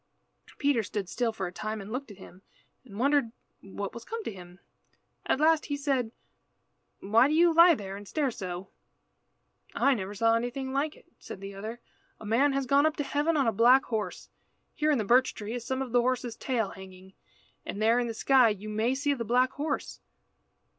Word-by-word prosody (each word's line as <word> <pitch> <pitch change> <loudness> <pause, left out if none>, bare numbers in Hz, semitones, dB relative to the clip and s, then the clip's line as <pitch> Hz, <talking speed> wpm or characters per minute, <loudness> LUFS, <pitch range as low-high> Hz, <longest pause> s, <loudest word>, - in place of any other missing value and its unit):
Peter 280 -5 +2
stood 205 -2 -4
still 235 +4 -1
for 195 -4 -4
a 175 - -5
time 215 +3 -5
and 200 +1 -9
looked 260 +2 -4
at 205 - -12
him, 190 -1 -14 0.4
and 210 -6 -12
wondered 275 -1 +2 0.3
what 195 0 -6
was 235 - -9
come 455 0 -6
to - - -4
him. 180 -1 -13 0.7
At - - +1
last 315 0 +3
he 285 - -2
said 270 -5 -1 0.9
"Why 225 +6 +4
do 300 - 0
you 340 +1 +5
lie 335 +1 +7
there 195 -5 -7
and 200 0 -10
stare 285 0 -1
so?" 185 -3 -6 1.1
"I 275 - +3
never 205 -3 -4
saw 225 +2 +3
anything 245 +3 -2
like 295 +3 -1
it," - - -20
said - - -9
the 195 0 -8
other. 220 +4 -7 0.4
"A - - -10
man 260 +7 +2
has 275 0 -1
gone 280 +3 +4
up 315 - -2
to 290 - -1
heaven 295 +3 0
on 275 - +2
a 225 - +3
black 240 +5 +5
horse. 210 -6 -4 0.4
Here 305 -1 0
in 295 - +3
the 220 - 0
birch 255 +5 +3
tree 210 +1 -6
is 240 -1 -5
some 260 +1 -1
of 255 - -8
the 245 0 +4
horse's 245 -2 -1
tail 235 -7 -1
hanging, 190 0 -13 0.5
and 200 - -6
there 225 +3 +3
in 240 - -1
the 225 - -5
sky 255 0 +4
you 210 0 -5
may 220 +4 0
see 285 +1 0
the 245 -4 -4
black 250 +3 +2
horse." 295 +2 -4
240 Hz, 210 wpm, -28 LUFS, 210-275 Hz, 1.1 s, lie